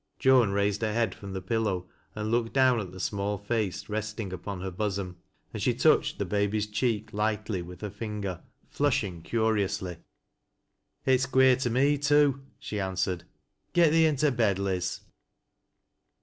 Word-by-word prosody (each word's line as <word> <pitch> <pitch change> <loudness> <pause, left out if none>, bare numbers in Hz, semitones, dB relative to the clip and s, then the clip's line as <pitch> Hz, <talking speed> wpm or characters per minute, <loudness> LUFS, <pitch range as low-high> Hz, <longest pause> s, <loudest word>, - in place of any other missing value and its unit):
Joan 130 -5 +5
raised 100 +1 0
her 110 -1 0
head 115 -4 +1
from 100 -1 -9
the 95 - -5
pillow 105 -6 -1 0.3
and 105 +1 -3
looked 115 -1 0
down 130 -3 +4
at 95 -4 -5
the 95 - -10
small 100 +2 -1
face 105 -1 -2
resting 110 -2 -4
upon 95 +1 -6
her 95 0 -4
bosom, 95 -1 -3 0.4
and - - -4
she - - +2
touched - - +3
the - - -1
baby's 105 +1 0
cheek 110 0 -1
lightly 105 -2 -1
with 90 0 -10
her 105 -2 -4
finger, 100 -5 -5 0.3
flushing 105 - 0
curi 110 +2 +1
ously. 90 -2 -4 0.6
" - - -49
It's 130 -1 +3
queer 130 -1 +5
to 130 -2 -1
me 140 +4 +2
too," 145 -1 +3 0.2
she 105 - -5
answered. 95 -2 -2 0.2
" - - -48
Get 170 -3 +5
thee 160 0 +5
into 150 -1 +2
bed, 110 -6 +2
Liz." 95 -2 -2
105 Hz, 165 wpm, -28 LUFS, 95-120 Hz, 0.6 s, Joan